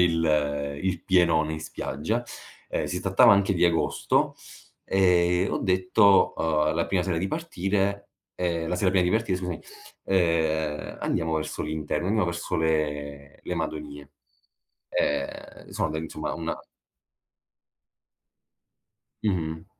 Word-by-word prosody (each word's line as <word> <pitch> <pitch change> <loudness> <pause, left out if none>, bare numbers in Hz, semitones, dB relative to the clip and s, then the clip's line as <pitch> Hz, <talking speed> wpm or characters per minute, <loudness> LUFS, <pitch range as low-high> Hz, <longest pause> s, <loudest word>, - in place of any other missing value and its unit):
il 75 -4 +1
il 95 -2 -1
pienone 80 -4 +3
in 80 - -6
spiaggia, 80 - -3 0.5
ehm, - - -1
si 90 - -3
trattava 100 +5 +6
anche 100 -1 +3
di 90 - +2
agosto, 85 -1 +1 0.5
ehm, 95 0 +1 0.4
e - - -3
ho - - -1
detto, 95 +2 +4
uhm, 75 -1 +1
la 85 - 0
prima 95 -2 +1
sera 90 -3 -1
di 95 - -1
partire 100 - -1 0.3
ehm, 85 -2 -1
la 90 - -1
sera 95 0 +2
prima 95 -1 +3
di 90 - +1
partire, 110 -4 +1
scusami, 90 -3 -4 0.4
uhm: 80 -4 0
"Andiamo 80 0 -1
verso 80 - -3
l'interno, 75 +3 -2
andiamo 105 -1 +1
verso 85 0 -3
le 75 -3 -2
le 90 - -3
Madonie." 75 -3 -5 0.8
Ehm, 70 -1 -2
sono 80 - -2
insomma 80 +1 -4
una - - -3 2.7
Mh-mh. 80 -5 -1
85 Hz, 125 wpm, -26 LUFS, 80-95 Hz, 2.7 s, trattava